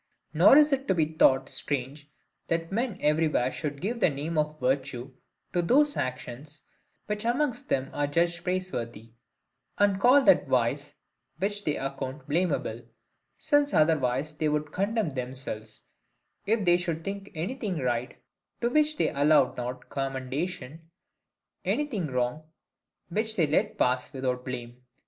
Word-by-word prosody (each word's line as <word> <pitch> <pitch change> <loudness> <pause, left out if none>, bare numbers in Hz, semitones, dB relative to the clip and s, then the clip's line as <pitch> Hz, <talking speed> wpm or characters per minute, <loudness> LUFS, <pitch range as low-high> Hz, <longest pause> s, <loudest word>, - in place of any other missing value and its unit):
Nor 275 - +7
is 300 -1 +6
it 270 0 -1
to 190 - +2
be 160 -3 +3
thought 135 -4 +3
strange, 145 +2 -3 0.4
that 165 +1 -1
men 230 +1 -1
everywhere 150 -4 +2
should 145 -1 -4
give 230 +6 -2
the 195 - +4
name 150 +3 -4
of 150 0 -1
virtue 130 0 -1 0.4
to 175 - +2
those 290 - +3
actions, 130 +3 -5 0.4
which 210 0 -3
amongst 245 +1 -1
them 135 0 0
are 145 0 0
judged 170 +3 0
praiseworthy; 120 - -3 0.7
and 200 -1 +3
call 265 +5 +6
that - - +5
vice, - - 0 0.4
which 205 +1 -2
they 150 - 0
account 135 0 -5
blamable: 175 +5 0 0.6
since 290 -1 +2
otherwise 150 -2 +2
they 155 +1 0
would 150 0 -1
condemn 200 -1 0
themselves, 125 -4 -6 0.6
if 215 -1 +1
they 175 0 +5
should 170 -2 -3
think 200 +1 -5
anything 195 +2 -3
right, 125 -3 -2 0.4
to 240 0 0
which 305 +2 +2
they - - +2
allowed 145 -2 +3
not 125 +1 -5
commendation, 135 +3 -4 0.7
anything 245 - -1
wrong, 125 +2 -1 0.7
which 220 +4 -1
they 170 - +3
let 150 +1 0
pass 125 +2 +1
without 130 -2 -2
blame. 120 -1 -7
155 Hz, 140 wpm, -28 LUFS, 130-195 Hz, 0.7 s, Nor